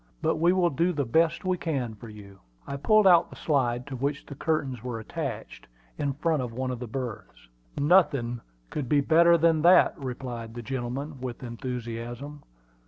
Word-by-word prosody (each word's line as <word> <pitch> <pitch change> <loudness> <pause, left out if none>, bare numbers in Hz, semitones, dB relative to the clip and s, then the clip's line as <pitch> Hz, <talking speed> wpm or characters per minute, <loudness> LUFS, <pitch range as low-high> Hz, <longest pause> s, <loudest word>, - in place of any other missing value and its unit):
"But - - +1
we 170 +2 +4
will 180 -2 +2
do 170 +5 +1
the 145 -3 -1
best 160 - +1
we 185 -1 0
can 135 -8 -2
for 110 +2 -11
you." 100 -2 -13 0.3
I 140 - -5
pulled 215 +9 +4
out 175 -2 +6
the - - -12
slide 125 -5 0
to 140 - -6
which 140 +3 -2
the - - -9
curtains 140 -5 -2
were 120 -3 -4
attached, 110 - -6 0.3
in 140 -1 -1
front 155 0 0
of 125 -2 -4
one 130 +2 -2
of 125 - -5
the 125 - -6
berths. 110 - -7 0.3
"Nothing 140 -7 +3 0.3
could 140 -5 -4
be 145 - +4
better 170 +3 +5
than 165 -1 +3
that," 175 +3 +6
replied 125 -4 -6
the 120 - -6
gentleman, 130 +3 -4
with 125 -1 -6
enthusiasm. 120 +3 -6
135 Hz, 180 wpm, -27 LUFS, 120-160 Hz, 0.3 s, out